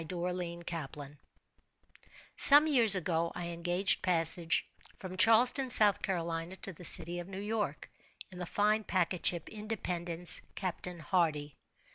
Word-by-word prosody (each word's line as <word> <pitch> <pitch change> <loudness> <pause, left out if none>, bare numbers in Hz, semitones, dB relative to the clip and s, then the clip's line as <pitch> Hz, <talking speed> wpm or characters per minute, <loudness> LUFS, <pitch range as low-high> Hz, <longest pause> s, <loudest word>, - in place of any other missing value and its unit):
_" - - -24
THE 185 - -7
OBLONG 175 -1 -7
BOX. 145 -3 -10 1.2
Some 290 +2 +9
years 240 -9 +5
ago, 170 -2 -4
I 175 -1 -7
engaged 175 +3 -3
passage 165 -2 +2 0.3
from 185 -1 -11
Charleston, 240 +7 +1
S. 250 - +7
C., 175 -4 -3
to 195 0 -9
the 175 - -16
city 175 +1 +1
of 175 - -10
New 195 0 -10
York, 205 -7 -6 0.4
in 180 - -13
the 180 - -7
fine 210 +3 -2
packet 185 -2 -4
ship 170 -2 -3
"Independence," 180 -6 -1
Captain 180 -1 -7
Hardy. 150 -4 -3
180 Hz, 140 wpm, -29 LUFS, 170-200 Hz, 1.2 s, Some